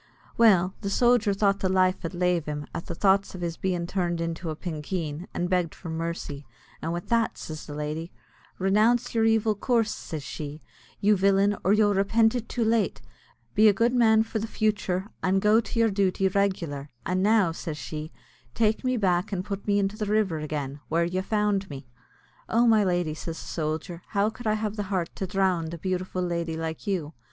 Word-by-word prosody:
Well 190 Hz, -5 st, +5 dB
the 200 Hz, -, -2 dB
sojer 240 Hz, 0 st, +3 dB
thought 200 Hz, -1 st, +2 dB
the 190 Hz, -, 0 dB
life 185 Hz, 0 st, +2 dB
id 170 Hz, +2 st, -4 dB
lave 175 Hz, -3 st, +1 dB
him, 150 Hz, -1 st, -4 dB
at -, -, -5 dB
the 170 Hz, -, -5 dB
thoughts 195 Hz, +1 st, +2 dB
iv 180 Hz, -, -7 dB
his 170 Hz, -1 st, -2 dB
bein' 180 Hz, -2 st, -1 dB
turned 175 Hz, -2 st, -1 dB
into 165 Hz, 0 st, -3 dB
a 155 Hz, -, -3 dB
pinkeen, 160 Hz, 0 st, -4 dB
and 175 Hz, -, -2 dB
begged 180 Hz, -3 st, 0 dB
for 165 Hz, -, -7 dB
mercy; 160 Hz, -3 st, -4 dB, 0.4 s
and 165 Hz, -, -2 dB
with 175 Hz, +1 st, -5 dB
that 230 Hz, -1 st, +1 dB
says 155 Hz, -1 st, -7 dB
the 145 Hz, -, -7 dB
lady 150 Hz, +3 st, -4 dB, 0.5 s
"Renounce 220 Hz, +6 st, +2 dB
your 225 Hz, -1 st, +2 dB
evil 225 Hz, -1 st, +3 dB
coorses," 225 Hz, +1 st, +1 dB
says 155 Hz, -3 st, -6 dB
she, 145 Hz, +3 st, -6 dB, 0.4 s
"you 210 Hz, +1 st, +5 dB
villain, 195 Hz, +1 st, +3 dB
or 190 Hz, -, +3 dB
you'll 210 Hz, -1 st, +4 dB
repint 220 Hz, +4 st, +3 dB
it 240 Hz, -2 st, -4 dB
too 235 Hz, -2 st, 0 dB
late; 220 Hz, -5 st, +1 dB, 0.5 s
be 215 Hz, +1 st, +6 dB
a 210 Hz, -, +6 dB
good 235 Hz, +4 st, +2 dB
man 220 Hz, -3 st, +5 dB
for 225 Hz, 0 st, -3 dB
the 220 Hz, -, -3 dB
futhur, 205 Hz, -4 st, 0 dB, 0.2 s
and 190 Hz, +1 st, +2 dB
go 210 Hz, +3 st, +4 dB
to 230 Hz, -, -6 dB
your 225 Hz, -1 st, +4 dB
duty 195 Hz, -1 st, +1 dB
reg'lar, 180 Hz, -8 st, -1 dB, 0.2 s
and 185 Hz, +1 st, 0 dB
now," 205 Hz, -3 st, +4 dB
says 165 Hz, -2 st, -5 dB
she, 155 Hz, 0 st, -6 dB, 0.4 s
"take 220 Hz, +1 st, +1 dB
me 255 Hz, -1 st, +1 dB
back 185 Hz, -1 st, +1 dB
and 185 Hz, -2 st, -2 dB
put 200 Hz, 0 st, -5 dB
me 205 Hz, 0 st, +3 dB
into 200 Hz, +1 st, 0 dB
the 210 Hz, -2 st, -2 dB
river 205 Hz, -6 st, +1 dB
again, 145 Hz, -2 st, -4 dB
where 170 Hz, +2 st, +2 dB
you 185 Hz, +2 st, -1 dB
found 205 Hz, -1 st, 0 dB
me." 135 Hz, -3 st, -8 dB, 0.6 s
"Oh, 235 Hz, +2 st, +3 dB
my 220 Hz, -3 st, +5 dB
lady," 175 Hz, -4 st, 0 dB
says 165 Hz, +1 st, -6 dB
the -, -, -9 dB
sojer, 160 Hz, +2 st, -3 dB
"how 205 Hz, +1 st, +1 dB
could 220 Hz, +1 st, -7 dB
I 215 Hz, -, +3 dB
have 215 Hz, 0 st, -3 dB
the 205 Hz, -2 st, -3 dB
heart 185 Hz, -4 st, -2 dB
to 190 Hz, -, -2 dB
drownd 180 Hz, -3 st, 0 dB
a -, -, -8 dB
beautiful 185 Hz, +1 st, -2 dB
lady 170 Hz, -2 st, -2 dB
like 160 Hz, +4 st, -5 dB
you?" 170 Hz, -6 st, -2 dB
190 Hz, 205 wpm, -26 LUFS, 165-210 Hz, 0.6 s, be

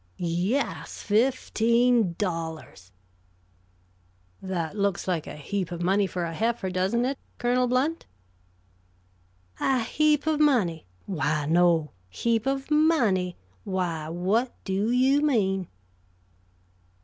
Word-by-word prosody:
"Yes, 180 Hz, +10 st, -2 dB
fifteen 235 Hz, -2 st, +2 dB
dollars." 160 Hz, -, -5 dB, 1.5 s
"That 180 Hz, -2 st, -3 dB
looks 200 Hz, -3 st, -1 dB
like 175 Hz, -4 st, -1 dB
a -, -, -7 dB
heap 180 Hz, +4 st, -4 dB
of 175 Hz, 0 st, -4 dB
money 195 Hz, +2 st, +2 dB
for 180 Hz, 0 st, -3 dB
a 165 Hz, -1 st, -3 dB
heifer, 225 Hz, -1 st, -1 dB
doesn't 190 Hz, +7 st, +1 dB
it, 270 Hz, +1 st, -2 dB, 0.2 s
Colonel 250 Hz, +1 st, +1 dB
Blount?" 270 Hz, +7 st, 0 dB, 1.5 s
"A 260 Hz, -3 st, +1 dB
heap 300 Hz, +4 st, +2 dB
of 310 Hz, -1 st, +1 dB
money? 220 Hz, -, +2 dB, 0.2 s
Why, 155 Hz, -5 st, -1 dB
no. 165 Hz, -1 st, +3 dB, 0.2 s
Heap 230 Hz, -, -1 dB
of 270 Hz, +2 st, -2 dB
money? 235 Hz, -, +2 dB, 0.3 s
Why, 175 Hz, -5 st, -2 dB
what 195 Hz, +9 st, 0 dB
do 195 Hz, +3 st, -1 dB
you 260 Hz, +4 st, +3 dB
mean?" 195 Hz, -, +1 dB
200 Hz, 110 wpm, -26 LUFS, 175-250 Hz, 1.5 s, no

